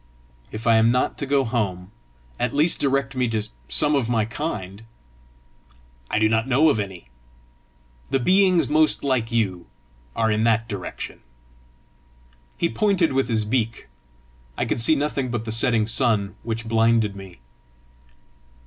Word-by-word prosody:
"If 110 +1 -7
I 115 -1 +5
am 110 +1 +4
not 125 +1 +1
to 140 - -3
go 140 0 +2
home, 100 -6 -3 0.5
at 125 +3 -1
least 155 +4 +3
direct 135 -1 0
me 125 -1 +1
to 110 -2 -1 0.3
some 150 0 +3
of 130 -5 0
my 115 -3 +1
kind." 110 - -5 1.3
"I - - 0
do 110 0 +3
not 110 +2 0
know 140 +5 +4
of 110 - -1
any. 95 -11 -6 1.0
The 135 - +1
beings 185 0 +3
most 155 +1 +2
like 130 -5 0
you 100 -7 -1 0.5
are 110 -1 +1
in 110 +1 +1
that 115 0 +2
direction." 100 -5 -7 1.4
He - - +1
pointed 180 - +1
with 135 -2 0
his 110 -2 0
beak. 115 - -2 0.7
I - - 0
could - - -1
see 155 +7 +5
nothing 140 -3 -2
but 120 -2 -3
the 110 - -3
setting 115 -1 +2
sun, 110 -3 0
which 115 -1 -4
blinded 115 -2 +2
me. 95 -3 -11
115 Hz, 150 wpm, -23 LUFS, 110-135 Hz, 1.4 s, I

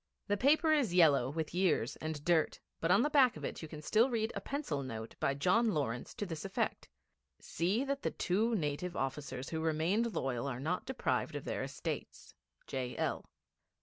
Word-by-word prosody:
The 205 - +1
paper 310 +7 +4
is 250 - +2
yellow 145 -7 +5
with 160 +2 -3
years 175 -9 +1
and 155 -2 -5
dirt, 170 -3 +2 0.2
but 165 - 0
on 195 +6 +5
the 295 - +2
back 265 -5 +5
of - - -5
it - - -5
you 160 - -6
can 150 -1 -9
still 225 - +4
read 225 -2 -1
a - - -3
pencil 275 - -3
note 115 -4 -6
by 140 - +1
John 195 +9 +3
Lawrence, 125 -5 -2
to 205 - -3
this 165 -4 -5
effect: 195 -1 -2 0.5
'See 190 +9 0
that 280 0 -2
the - - 0
two 220 +6 +1
native 170 +1 -2
officers 135 -1 -3
who 160 -1 -2
remained 170 +9 +1
loyal 130 -1 -1
are 125 -3 -3
not 165 +7 -2
deprived - - -1
of - - -5
their - - -2
estates. - - -5 0.3
J.L.' 130 -2 -2
165 Hz, 185 wpm, -34 LUFS, 140-220 Hz, 0.5 s, yellow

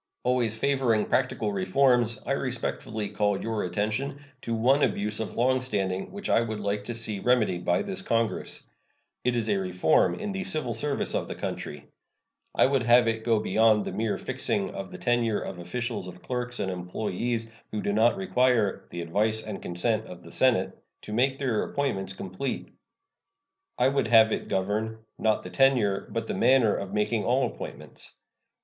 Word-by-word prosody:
Always 120 -3 +1
favoring 130 -4 +2
practical 115 -5 0
reforms, 120 +4 +3
I - - -2
respectfully 115 -5 -2
call 105 -1 0
your 110 -2 -2
attention 110 +10 -1 0.2
to 115 - -2
one 130 +6 +3
abuse 105 -3 0
of 110 - -4
long 130 +2 +3
standing 95 -7 -1
which 200 +1 -6
I - - +4
would 110 -2 -3
like 100 0 -2
to 120 - -4
see 110 -3 -3
remedied 110 -6 +2
by - - +2
this 195 -1 -2
Congress. 115 - -1 0.6
It 125 0 +1
is 115 -2 0
a 105 -2 +2
reform 90 -4 +2
in 210 -1 -4
the 195 -1 -3
civil 155 -11 -2
service 140 +5 -1
of - - -1
the - - -5
country. 75 0 -5 0.7
I - - +5
would 135 -1 +2
have 120 0 +5
it 110 0 -1
go 115 -2 +3
beyond 110 +1 +3
the - - -3
mere 110 -1 -1
fixing 100 -2 -2
of 95 -1 -7
the - - -7
tenure 120 -3 +1
of 90 - -6
office 115 +3 -3
of 90 0 -11
clerks 125 -1 -3
and 95 - -1
employees 110 +6 -2 0.2
who 105 - -3
do 100 - 0
not 115 - +4
require 125 - +1
"the 85 - -5
advice 110 +6 +1
and 105 -2 -6
consent 110 +5 0
of 90 -1 -10
the - - -12
Senate" 130 -3 +2 0.3
to 105 - -6
make 130 +4 +2
their 125 -6 0
appointments 95 -10 -1
complete. 95 +8 -4 1.1
I 125 - +4
would 140 -3 +1
have 110 -1 +6
it - - -2
govern, 110 +3 -2
not 110 -1 +1
the - - -8
tenure, 125 -8 +3
but 115 +2 -3
the - - -3
manner 130 -5 +4
of 100 - -4
making 105 +1 0
all 130 +2 +2
appointments. - - -7
110 Hz, 180 wpm, -27 LUFS, 105-125 Hz, 1.1 s, have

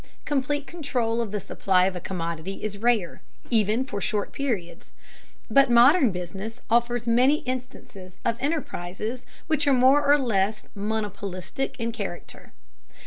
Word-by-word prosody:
Complete 290 0 0
control 250 -9 -1
of 230 - -3
the 210 +1 -2
supply 185 -1 +1
of 190 -1 -1
a - - -3
commodity 170 0 -4
is 205 -1 -4
rare, 225 -6 +1 0.3
even 220 +2 +2
for 205 -6 -5
short 205 0 -1
periods, 220 -12 -4 0.5
but 275 -1 +5
modern 245 - +6
business 190 +6 -6
offers 240 0 +2
many 250 +6 +4
instances 250 -8 -7
of 230 - +2
enterprises 245 - -3 0.2
which 310 -2 0
are 280 - +5
more 265 +3 +5
or 290 +1 +5
less 215 -5 0
monopolistic 210 +4 -4
in 230 0 -1
character. 200 -6 -7
230 Hz, 140 wpm, -25 LUFS, 195-260 Hz, 0.5 s, modern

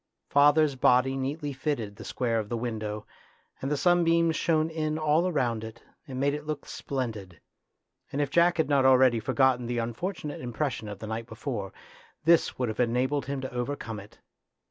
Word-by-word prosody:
Father's 145 +1 +5
body 125 +1 +3
neatly 140 +2 -3
fitted 130 -7 -3
the - - -10
square 115 -3 -1
of 105 -1 -5
the 120 - -1
window, 110 -3 -4 0.6
and 135 - -2
the 150 - 0
sunbeams 170 +1 +3
shone 160 -1 +2
in 155 -1 -2
all 160 +4 +2
round 120 -7 0
it 110 +1 -9 0.2
and 130 -2 -5
made 140 +1 +2
it 150 0 -6
look 150 -2 -4
splendid; 110 - -5 0.7
and 140 - -3
if 145 -2 0
Jack 170 +2 +4
had 160 -3 +2
not 140 -2 +3
already 130 -2 +5
for 110 - -3
gotten 130 -3 +3
the 120 0 -2
unfortunate 150 - -4
impression 125 -1 -3
of 105 - -6
the 110 - -8
night 110 +1 -4
before, 110 -8 -5 0.5
this 170 0 +4
would 125 - 0
have 110 - -5
enabled 125 +3 +1
him 140 -1 -3
to 130 0 -6
over 125 +3 -2
come 110 -5 -6
it. 100 +1 -14
130 Hz, 190 wpm, -28 LUFS, 115-150 Hz, 0.7 s, Father's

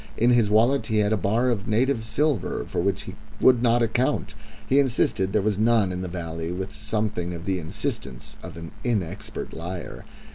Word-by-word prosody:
In 120 +2 +4
his 120 -4 +4
wallet 120 +6 +3
he 110 - 0
had 105 0 +3
a - - +4
bar 110 +6 +1
of 100 -4 -2
native 115 +2 +2
silver 125 - 0
for - - -1
which 100 +2 0
he - - -8 0.2
would 125 -2 +5
not 120 0 +4
account; 115 -2 0 0.3
he 135 - +4
insisted 115 -7 +1
there 105 -1 +2
was 105 -1 0
none 110 -4 +3
in 90 0 -3
the 95 - -3
valley 85 -1 -4
with 95 +2 -4
something 105 -5 -2
of 85 0 -8
the 95 -2 0
insistence 80 - -4
of - - -9
an 85 -2 -8
inexpert 100 -6 -3
liar. 85 +2 -6
105 Hz, 190 wpm, -25 LUFS, 90-120 Hz, 0.3 s, would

